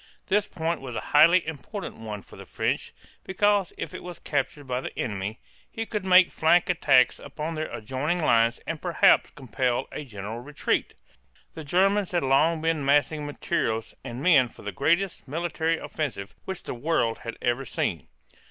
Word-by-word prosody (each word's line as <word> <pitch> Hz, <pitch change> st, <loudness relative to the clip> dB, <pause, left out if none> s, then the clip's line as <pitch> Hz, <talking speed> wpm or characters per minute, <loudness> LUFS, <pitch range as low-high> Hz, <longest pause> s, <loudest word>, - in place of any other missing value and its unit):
This 205 Hz, +1 st, +1 dB
point 165 Hz, -2 st, -2 dB
was 125 Hz, -3 st, -7 dB
a -, -, -1 dB
highly 165 Hz, +4 st, +6 dB
important 165 Hz, -, -6 dB
one 105 Hz, -3 st, -7 dB
for -, -, -15 dB
the -, -, -11 dB
French, -, -, -2 dB, 0.3 s
because 200 Hz, 0 st, +2 dB
if -, -, -5 dB
it -, -, -7 dB
were 180 Hz, 0 st, -8 dB
captured 145 Hz, -1 st, -2 dB
by 125 Hz, -1 st, -2 dB
the -, -, -7 dB
enemy, 105 Hz, +1 st, -3 dB, 0.3 s
he 225 Hz, -, -4 dB
could 210 Hz, -3 st, -3 dB
make 185 Hz, -1 st, +6 dB
flank 175 Hz, +3 st, +3 dB
attacks 130 Hz, -7 st, +4 dB
upon 150 Hz, +3 st, -5 dB
their 155 Hz, 0 st, -3 dB
adjoining 135 Hz, +10 st, -2 dB
lines 115 Hz, -5 st, +3 dB
and 165 Hz, -2 st, -4 dB
perhaps 175 Hz, -3 st, +4 dB
compel 125 Hz, -2 st, -2 dB
a -, -, -5 dB
general 110 Hz, -2 st, -7 dB
retreat. 145 Hz, +4 st, -2 dB, 0.6 s
The 160 Hz, -, -7 dB
Germans 195 Hz, +5 st, +2 dB
had 175 Hz, -, +1 dB
long 155 Hz, +5 st, +3 dB
been 160 Hz, -3 st, +1 dB
massing 145 Hz, +2 st, +2 dB
materials 115 Hz, -7 st, -2 dB
and 120 Hz, +3 st, -6 dB
men 145 Hz, -8 st, +6 dB
for -, -, -15 dB
the 105 Hz, -, -4 dB
greatest 170 Hz, -, 0 dB
military 165 Hz, +2 st, -1 dB
offensive 125 Hz, -14 st, -4 dB
which 190 Hz, -2 st, -5 dB
the -, -, -5 dB
world 120 Hz, -3 st, 0 dB
had 115 Hz, -, -7 dB
ever 120 Hz, +2 st, 0 dB
seen. 130 Hz, -, -2 dB
150 Hz, 170 wpm, -26 LUFS, 125-170 Hz, 0.6 s, highly